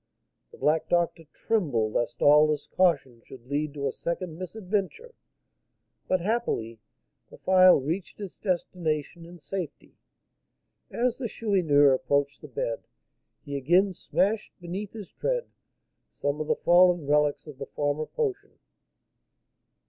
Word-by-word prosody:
The - - -14
black 155 +2 +1
doctor 170 -1 +1
trembled 135 - 0
lest 120 0 -1
all 150 +1 +7
this 150 -1 -1
caution 140 -10 +1
should 125 -3 -13
lead 145 +2 -2
to 140 -1 -2
a - - -1
second 170 +2 -4
misadventure, 200 - -4 0.9
but, 185 -1 +1
happily, 175 - -2 0.5
the - - -14
phial 185 -2 +6
reached 165 +10 -4
its 200 -3 -7
destination 170 -3 -2
in 175 +1 -12
safety. 175 -1 -6 1.0
As 245 +1 -1
the 250 - -2
Chourineur 165 -12 +3
approached 140 +2 0
the 150 - -9
bed, 115 -3 -4 0.6
he 140 - -5
again 175 +8 +3
smashed 205 +4 -1
beneath 185 +4 -6
his 210 -4 -9
tread - - -2 0.6
some 145 +2 -3
of 155 - -4
the - - +2
fallen 175 -2 +4
relics 150 0 +2
of 150 -4 -11
the 140 - -6
former 145 +1 -2
potion. 420 -2 -3
170 Hz, 135 wpm, -27 LUFS, 145-190 Hz, 1.0 s, all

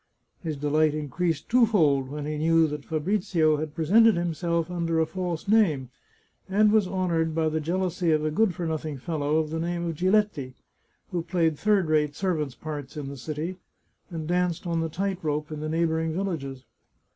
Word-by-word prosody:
His 155 -4 -3
delight 150 +1 +2
increased 155 +1 -2
twofold 170 - +3
when 145 +1 -5
he 150 0 -3
knew 165 +1 +4
that 150 -2 -4
Fabrizio 160 -1 +1
had 155 0 -5
presented 215 +8 +5
himself 170 0 -1
under 165 -2 0
a 160 - +3
false 180 0 -4
name, 160 - +3 0.6
and 210 +2 +4
was 215 -3 +3
honoured 170 -4 0
by 160 -1 +2
the 160 +1 -1
jealousy 175 +2 -1
of 155 0 +2
a 155 - 0
good 190 +2 +2
for 175 - -3
nothing 155 -2 -3
fellow 150 +1 -1
of 155 -1 0
the 160 - -2
name 170 +1 -2
of 165 - -2
Giletti, 185 -7 +1 0.6
who 175 -2 -1
played 165 -2 +1
third 205 -4 +2
rate 150 -2 +1
servants' 155 -8 -1
parts 150 -3 -7
in 140 -2 -4
the 140 - -7
city, 155 +6 -5 0.5
and 160 -3 -5
danced 180 0 0
on 170 -1 0
the 165 - -2
tight 190 +3 -2
rope 150 0 -2
in 155 - -5
the 155 +1 -3
neighbouring 160 0 0
villages. 155 -8 -3
160 Hz, 180 wpm, -26 LUFS, 150-180 Hz, 0.6 s, presented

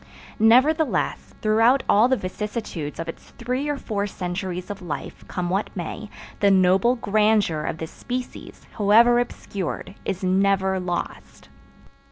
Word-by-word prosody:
Nevertheless, 265 +8 +3
throughout 225 +5 +4
all 215 +4 +5
the 260 0 +2
vicissitudes 185 -6 -5
of 165 - -4
its 165 - -9
three 255 +4 -2
or 290 - -1
four 205 -5 -2
centuries 180 0 -4
of 205 0 -7
life, 175 -4 -6
come 180 -1 -3
what 195 +3 0
may, 200 +4 -5 0.3
the 200 - +4
noble 190 +5 +4
grandeur 210 -7 +2
of - - -3
this 160 0 -6
species, 250 0 -7
however 230 +4 +6
obscured, 200 -8 -4
is 190 -1 -3
never 190 0 +2
lost. 180 -1 -5
205 Hz, 135 wpm, -23 LUFS, 185-235 Hz, 0.3 s, however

